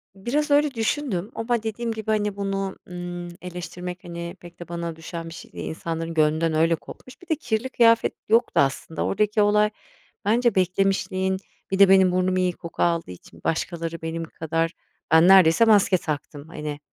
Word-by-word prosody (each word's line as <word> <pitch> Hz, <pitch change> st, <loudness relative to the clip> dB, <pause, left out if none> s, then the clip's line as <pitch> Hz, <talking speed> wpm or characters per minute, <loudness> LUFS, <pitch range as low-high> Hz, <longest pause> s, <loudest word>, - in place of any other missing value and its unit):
Biraz 285 Hz, +10 st, -1 dB
öyle 290 Hz, -1 st, +4 dB
düşündüm 225 Hz, -4 st, -2 dB
ama 230 Hz, 0 st, -1 dB
dediğim 225 Hz, +1 st, -3 dB
gibi, 220 Hz, -1 st, -3 dB
hani, 210 Hz, -2 st, 0 dB
bunu, 195 Hz, -1 st, -2 dB
ımm, 175 Hz, 0 st, -6 dB
eleştirmek, 180 Hz, 0 st, -7 dB
hani, 170 Hz, 0 st, -6 dB
pek 175 Hz, -1 st, -14 dB
de 175 Hz, -, -8 dB
bana 170 Hz, -1 st, -4 dB
düşen 165 Hz, +1 st, -7 dB
bir -, -, -9 dB
şey -, -, -11 dB
değil, -, -, -5 dB
insanların 165 Hz, 0 st, -4 dB
gönlünden 160 Hz, +1 st, +2 dB
öyle 165 Hz, +2 st, +3 dB
kopmuş, 255 Hz, +9 st, -13 dB
bir 360 Hz, -, -16 dB
de 320 Hz, -, +3 dB
kirli 245 Hz, -4 st, -2 dB
kıyafet 230 Hz, -2 st, +4 dB, 0.2 s
yoktu 230 Hz, +2 st, +3 dB
aslında 140 Hz, +3 st, -1 dB
oradaki 210 Hz, +1 st, +1 dB
olay 210 Hz, +1 st, +4 dB, 0.6 s
bence 235 Hz, +2 st, +2 dB
beklemişliğin, 190 Hz, 0 st, +1 dB, 0.3 s
bir 190 Hz, -, 0 dB
de 200 Hz, -1 st, +8 dB
benim 190 Hz, -1 st, +6 dB
burnum 185 Hz, 0 st, +1 dB
iyi 180 Hz, -1 st, +1 dB
koku 170 Hz, 0 st, -4 dB
aldığı 170 Hz, -, 0 dB
için 85 Hz, -2 st, -14 dB
başkaları 165 Hz, 0 st, -2 dB
benim 165 Hz, +1 st, -4 dB
kadar 165 Hz, 0 st, -2 dB, 0.4 s
ben 160 Hz, +2 st, +7 dB
neredeyse 190 Hz, +2 st, +7 dB
maske 205 Hz, -4 st, +5 dB
taktım, 150 Hz, -2 st, -5 dB
hani, 150 Hz, -3 st, -6 dB
180 Hz, 170 wpm, -24 LUFS, 165-210 Hz, 0.6 s, de